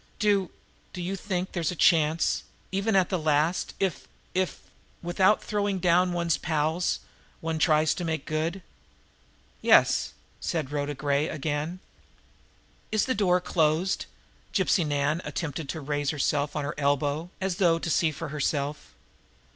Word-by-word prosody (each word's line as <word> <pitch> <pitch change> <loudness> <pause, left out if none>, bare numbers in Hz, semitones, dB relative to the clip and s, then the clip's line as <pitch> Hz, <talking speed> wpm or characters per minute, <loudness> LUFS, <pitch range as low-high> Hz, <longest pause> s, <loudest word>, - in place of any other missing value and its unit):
"Do 200 -4 +2 0.4
do 180 - -6
you 180 +2 -2
think 185 -1 -3
there 175 - -3
is 160 - +1
a - - -5
chance 160 -1 +3 0.3
even 195 +3 0
at 185 -2 +4
the 185 - 0
last 155 +3 +1
if 190 -3 -1 0.3
if, 185 0 -1 0.4
without 190 +4 +3
throwing 205 -2 -1
down 180 0 +3
one's 170 -2 0
pals, 160 +2 0 0.4
one 160 -1 -2
tries 155 -1 +4
to 180 - -5
make 160 -4 -2
good?" 165 +4 -2 1.0
"Yes," - - +4 0.3
said 155 -5 -2
Rhoda 145 0 -2
Gray 145 +2 +1
again. 155 +4 -3 1.1
"Is 215 -1 +2
the 260 - +1
door 185 -4 +3
closed?" 165 +1 +1 0.4
Gypsy 190 -2 +2
Nan 145 +2 0
attempted 150 -3 -4
to 160 - -4
raise 145 0 -1
herself 145 -1 0
on 150 - -1
her 150 - -3
elbow, 145 +3 0
as 190 -2 -1
though 170 -4 +4
to 165 - -4
see 165 +1 +3
for 155 +1 -6
herself. 145 - -2
165 Hz, 145 wpm, -27 LUFS, 150-180 Hz, 1.1 s, at